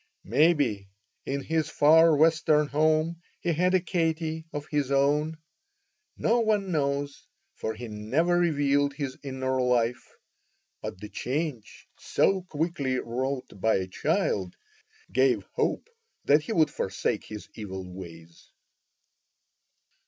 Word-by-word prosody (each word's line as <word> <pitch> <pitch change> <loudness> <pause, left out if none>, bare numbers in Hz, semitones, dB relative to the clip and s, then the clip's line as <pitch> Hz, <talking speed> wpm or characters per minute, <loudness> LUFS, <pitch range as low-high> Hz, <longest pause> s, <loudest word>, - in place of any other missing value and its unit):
Maybe 125 - +2 0.4
in 140 +1 -1
his 160 -1 0
far 160 +2 +6
Western 155 0 +4
home 155 +3 +1 0.2
he 170 - 0
had 180 +4 +2
a - - +5
Katie 160 -2 -1
of 145 -1 -5
his 145 -3 -1
own. 145 +3 +2 0.8
No 235 +2 +2
one 210 -4 +1
knows, 140 -2 -2 0.3
for 110 - -4
he 120 +2 -7
never 125 +12 0
revealed 145 -4 +2
his 140 -3 -4
inner 130 -1 -2
life; 120 -1 0 0.6
but - - -6
the 105 - -8
change 130 -3 -4
so 195 -1 +2
quickly 155 -6 -2
wrought 125 -3 -4
by 110 +2 +3
a 95 - 0
child 95 0 -1 0.6
gave - - +3
hope - - -1 0.4
that 145 +2 +5
he 150 - -6
would 160 -7 +3
forsake 95 0 -2
his 105 -1 -8
evil 95 -4 -7
ways. 85 -3 -11
145 Hz, 125 wpm, -27 LUFS, 120-160 Hz, 0.8 s, far